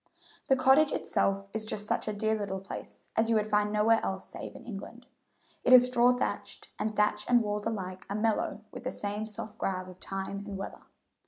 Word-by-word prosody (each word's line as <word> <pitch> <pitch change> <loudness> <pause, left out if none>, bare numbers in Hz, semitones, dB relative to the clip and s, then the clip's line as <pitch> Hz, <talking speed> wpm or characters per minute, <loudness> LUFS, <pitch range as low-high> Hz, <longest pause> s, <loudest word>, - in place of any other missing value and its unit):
The 265 - +6
cottage 265 +3 +5
itself 195 0 0
is 220 0 -1
just 210 -1 -2
such - - -1
a - - +1
dear 220 +1 0
little 200 -3 -2
place 195 - -9
as 225 +1 +2
you 225 - +4
find 210 0 +1
nowhere 215 +2 +4
else 190 0 -3
save - - -7
in - - -11
England. 235 +2 -8 0.6
It 255 - +5
is 250 -1 +10
straw 250 -1 +4
thatched, 250 0 -3
and 215 0 -1
thatch 210 0 +2
and 240 -1 +5
walls 210 0 -2
alike 185 -4 -4
are 200 - -2
mellow 215 -1 0
with - - -8
the 255 - -2
same 210 +1 -4
soft 215 0 -8
grav 185 -1 -2
of 185 0 -12
time 195 0 -4
and 200 -1 -5
weather. 195 - -6
210 Hz, 200 wpm, -30 LUFS, 200-230 Hz, 0.6 s, is